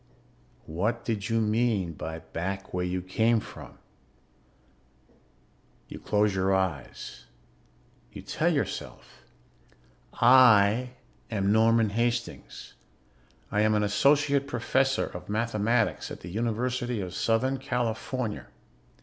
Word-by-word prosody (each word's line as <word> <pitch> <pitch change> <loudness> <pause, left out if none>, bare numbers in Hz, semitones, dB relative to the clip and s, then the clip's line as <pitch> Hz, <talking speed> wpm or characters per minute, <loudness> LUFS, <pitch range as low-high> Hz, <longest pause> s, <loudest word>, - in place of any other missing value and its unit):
What 105 +9 -2
did 110 -1 -2
you 115 0 +2
mean 110 -5 0
by 80 +1 -6
back 90 +4 -5
where 90 0 -1
you 90 0 -2
came 110 +5 +2
from? - - -11 2.1
You - - -8
close 105 -1 +1
your 95 0 +1
eyes. 95 -6 -4 0.9
You - - -10
tell - - 0
yourself: - - -4 0.9
_I 120 -2 +5 0.4
am 100 -3 0
Norman 110 0 +3
Hastings. 120 +2 -3 0.8
I 105 - +1
am 110 0 +3
an 105 - +2
associate 140 +6 +2
professor 135 +2 +1
of - - -9
mathematics 115 +1 0
at - - -9
the 85 - -8
University 120 +2 -2
of 90 -2 -5
Southern 130 +7 0
California. 125 -2 -3
110 Hz, 105 wpm, -27 LUFS, 100-120 Hz, 2.1 s, I